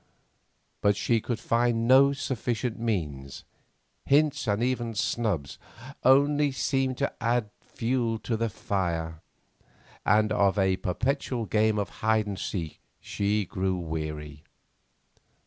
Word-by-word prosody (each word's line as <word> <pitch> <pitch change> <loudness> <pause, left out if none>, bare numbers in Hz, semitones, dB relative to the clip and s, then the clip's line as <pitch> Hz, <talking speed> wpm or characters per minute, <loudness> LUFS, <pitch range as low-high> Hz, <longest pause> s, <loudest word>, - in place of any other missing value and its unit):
But 100 0 +3
she 115 -2 +1
could 120 0 -3
find 115 0 +1
no 135 +2 +7
sufficient 125 -4 -2
means; 75 - -3 0.6
hints, 145 -2 +2
and 105 +2 +1
even 120 -3 -1
snubs, 100 - -1 0.4
only 145 +2 +4
seemed 135 -1 0
to 140 - -1
add 115 -2 0
fuel 115 -1 -1
to 115 - -2
the 115 +1 -1
fire, 85 -6 -3 0.8
and 105 0 +3
of 100 0 +2
a 95 -1 +2
perpetual 125 +5 -1
game 110 0 +2
of 100 - -1
hide 110 -1 +2
and 100 -2 -5
seek 85 -6 -4 0.2
she 105 0 -1
grew 95 +1 -1
weary. 75 -3 -5
110 Hz, 120 wpm, -27 LUFS, 95-125 Hz, 0.8 s, no